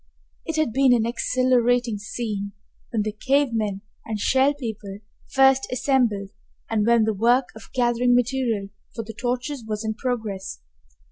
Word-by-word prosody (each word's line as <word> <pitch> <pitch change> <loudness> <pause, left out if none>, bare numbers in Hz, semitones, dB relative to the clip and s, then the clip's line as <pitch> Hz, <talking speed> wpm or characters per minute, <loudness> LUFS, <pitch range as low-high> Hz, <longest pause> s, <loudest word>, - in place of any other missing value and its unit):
It 325 - -2
had 310 -7 +1
been 265 -2 +5
an 225 -2 +1
exhilarating 245 -2 +1
scene 205 -2 -4 0.4
when 220 -3 0
the 215 - -2
cave 270 +6 +1
men 210 -3 -2 0.2
and 215 -1 -4
Shell 265 +6 +3
People 220 -7 -6 0.3
first 270 0 +4
assembled 240 -7 +1 0.4
and 215 -1 +1
when 235 -1 +5
the 220 0 +1
work 240 +5 +2
of 220 - -12
gathering 245 0 +2
material 245 -5 0 0.3
for 230 - -3
the 225 +1 -8
torches 245 +3 -3
was 215 0 -4
in 220 - -1
progress. 220 - -4
235 Hz, 150 wpm, -24 LUFS, 215-255 Hz, 0.4 s, been